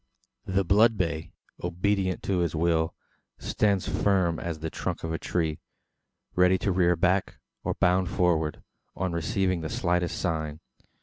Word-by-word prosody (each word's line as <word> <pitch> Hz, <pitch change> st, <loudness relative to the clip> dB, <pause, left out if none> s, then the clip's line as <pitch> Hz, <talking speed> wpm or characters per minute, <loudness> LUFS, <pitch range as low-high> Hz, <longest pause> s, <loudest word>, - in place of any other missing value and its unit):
The 95 Hz, +1 st, +1 dB
blood 110 Hz, +5 st, +4 dB
bay, 80 Hz, -3 st, -2 dB, 0.3 s
obedient 95 Hz, +2 st, 0 dB
to 95 Hz, -2 st, 0 dB
his 85 Hz, -2 st, 0 dB
will, 80 Hz, 0 st, +1 dB, 0.4 s
stands 100 Hz, -3 st, 0 dB
firm 95 Hz, -5 st, +1 dB
as 85 Hz, -2 st, -4 dB
the 80 Hz, 0 st, -5 dB
trunk -, -, -4 dB
of 80 Hz, 0 st, -2 dB
a 80 Hz, -, -2 dB
tree 80 Hz, -3 st, -1 dB, 0.7 s
ready 90 Hz, +1 st, +4 dB
to 100 Hz, -, -1 dB
rear 90 Hz, -1 st, +3 dB
back, 90 Hz, +3 st, +1 dB, 0.3 s
or -, -, -1 dB
bound 90 Hz, 0 st, +2 dB
forward, 80 Hz, -4 st, +1 dB, 0.3 s
on 95 Hz, -2 st, -2 dB
receiving 95 Hz, 0 st, 0 dB
the 80 Hz, -, -4 dB
slightest 90 Hz, +1 st, 0 dB
sign. 80 Hz, -3 st, -2 dB
90 Hz, 145 wpm, -27 LUFS, 80-95 Hz, 0.7 s, blood